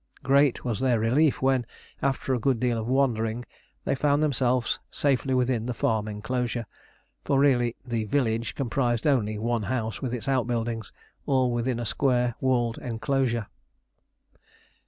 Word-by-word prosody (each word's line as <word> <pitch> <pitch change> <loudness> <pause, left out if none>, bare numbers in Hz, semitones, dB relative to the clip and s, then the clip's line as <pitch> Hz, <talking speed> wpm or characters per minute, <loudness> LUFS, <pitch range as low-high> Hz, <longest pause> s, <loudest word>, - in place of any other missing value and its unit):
Great 140 -1 +3
was 120 -4 -1
their 125 -3 +2
relief 125 +3 +2
when, 130 -2 +3 0.4
after 135 -1 0
a 125 - +1
good 125 0 +1
deal 120 -1 +1
of 110 - -4
wandering, 120 -3 +1 0.4
they - - +1
found 145 +2 +2
themselves 130 -4 +1
safely 135 -2 0
within 125 -2 +1
the 125 - -3
farm 110 -1 0
enclosure; 120 +2 -2 0.6
for 140 - +1
really 125 -4 +3
the 115 -3 -2
"village" 115 -1 0
comprised 120 -3 0
only 110 -8 +2
one 115 +1 -1
house 110 0 -3
with 130 - -2
its 125 - -6
outbuildings, 120 -4 -1 0.4
all 130 -2 +2
within 120 0 -1
a 120 - -3
square 125 0 +1
walled 120 -3 +1
enclosure. 120 -1 -1
125 Hz, 145 wpm, -26 LUFS, 115-135 Hz, 0.6 s, Great